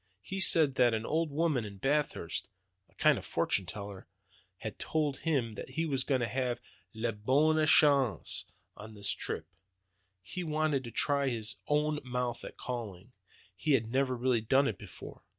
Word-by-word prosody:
He 195 - -4
said 160 -6 +6
that 120 -2 +5
an 110 0 -3
old 160 +1 0
woman 150 -4 +1
in 100 -2 -8
Bathurst, 135 - -1 0.4
a - - -30
kind - - +4
of - - -11
fortune 95 -3 0
teller, 100 0 -7 0.5
had 110 +3 -7
told 150 -4 -1
him 135 -9 0
that - - -7
he 165 +1 -1
was 135 -4 0
going 130 -3 +1
to 120 - +1
have 125 -1 -1 0.4
'la 115 +1 -1
bonne 145 +9 +2
chance' 140 -7 +4 0.3
on 110 +1 -10
this 100 -1 -1
trip. - - -3 0.8
He 180 - -5
wanted 155 -3 0
to 120 - -7
try 140 +1 +2
his 110 -4 -3
own 150 0 +1
mouth 125 -1 -3
at - - -9
'calling.' 115 -4 -6 0.4
He 95 +11 +1
had 115 -4 +1
never 130 -1 +1
really 120 -1 +2
done 135 +5 +3
it 110 - -3
before. - - -11
130 Hz, 170 wpm, -31 LUFS, 110-150 Hz, 0.8 s, said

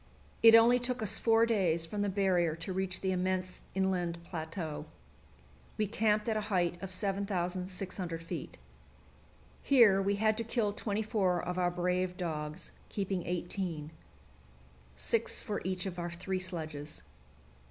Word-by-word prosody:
It 225 0 +9
only 235 +2 +7
took 245 -1 -2
us 210 - +2
four 225 0 +4
days 180 -8 +2
from 205 +5 -3
the 205 - +1
barrier 185 -4 +2
to 165 +3 -5
reach 190 0 -1
the 190 - 0
immense 185 0 -1
inland 185 -3 0
plateau. 160 -2 -5 0.9
We 215 - +2
camped 215 +1 +1
at 220 - +1
a 215 - 0
height 175 -3 +1
of 195 -1 -5
7,600 185 -3 -2
feet. 165 - -6 1.0
Here 225 -8 +6
we 200 +1 +1
had 215 +1 +2
to - - 0
kill 225 -2 0
twenty 210 +1 -2
four 195 -5 +1
of 180 +1 -3
our 180 -1 +3
brave 180 +1 -1
dogs, 155 -1 -4 0.2
keeping 195 -3 -2
eighteen 175 -3 -3 1.0
six 230 - +1
for 210 -2 -3
each 185 0 -2
of 180 -2 -4
our 175 0 -2
three 185 +2 -3
sledges. 155 - -5
185 Hz, 145 wpm, -32 LUFS, 175-205 Hz, 1.0 s, It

